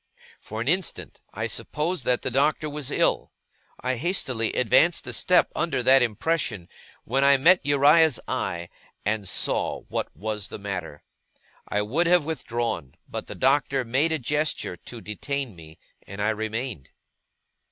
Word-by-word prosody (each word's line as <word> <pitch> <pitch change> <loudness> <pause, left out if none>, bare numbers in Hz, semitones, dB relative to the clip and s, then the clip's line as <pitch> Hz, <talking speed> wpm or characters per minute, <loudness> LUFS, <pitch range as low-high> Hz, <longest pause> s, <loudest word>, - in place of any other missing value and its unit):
For 110 +1 -6
an 120 - -4
instant, 180 +2 -1
I - - -3
supposed 155 -1 -2
that 125 -1 +1
the - - -2
Doctor 145 +4 +1
was 150 -2 -3
ill. - - +1 0.5
I 130 0 -1
hastily 130 - 0
advanced 155 +8 +3
a - - -3
step 180 -1 +3
under 165 -7 0
that 130 +2 +6
impression, 115 - -1 0.3
when 135 +4 0
I 140 0 +6
met 180 +7 +5
Uriah's 145 0 +5
eye, 85 -2 -3 0.4
and 105 -2 0
saw - - +1
what - - -2
was 105 +1 -3
the - - -7
matter. 90 -7 -6 0.6
I 105 0 0
would 150 +12 +1
have 175 -3 +4
withdrawn, 120 - -3
but - - -6
the - - -7
Doctor 135 -1 +2
made 135 +8 +1
a 160 - +1
gesture 150 -6 -1
to 115 +6 -11
detain 130 +3 -4
me, 80 -1 -13 0.3
and 100 +1 -9
I 105 +1 +1
remained. 110 - -4
125 Hz, 150 wpm, -25 LUFS, 105-150 Hz, 0.6 s, that